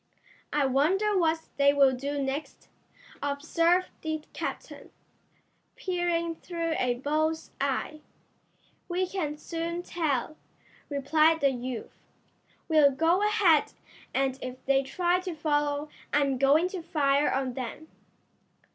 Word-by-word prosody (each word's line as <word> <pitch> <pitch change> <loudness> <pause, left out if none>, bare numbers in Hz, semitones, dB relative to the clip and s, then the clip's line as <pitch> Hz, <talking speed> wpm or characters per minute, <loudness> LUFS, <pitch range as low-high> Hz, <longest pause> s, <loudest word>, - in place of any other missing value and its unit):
"I 295 -1 +2
wonder 360 +11 +2
what 325 -3 +2 0.2
they 280 0 +4
will 275 -2 +5
do 285 +3 -3
next?" 275 +2 -4 0.5
observed 330 +5 +1
the 315 -1 -3
captain, - - -6 0.9
peering 345 -2 -1
through 335 -2 -3
a 245 -1 +1
bull's 310 +5 -1
eye. 280 +2 -1 0.9
"We 360 +2 0
can 340 -6 -3
soon 335 +2 -4
tell," 310 -4 -2 0.5
replied 310 +3 +3
the 275 -1 +4
youth. 245 -2 -5 0.7
"We'll 310 -3 +6
go 325 +7 +2
ahead, 415 -8 +3 0.4
and 270 0 0
if 255 0 -7
they 270 0 +3
try 350 +6 0
to 365 -2 -5
follow 295 -1 0 0.2
I'm 275 -3 +2
going 290 +6 +4
to 370 -2 -5
fire 290 -3 +2
on 265 -1 -1
them." 260 +5 -6
305 Hz, 120 wpm, -28 LUFS, 275-335 Hz, 0.9 s, We'll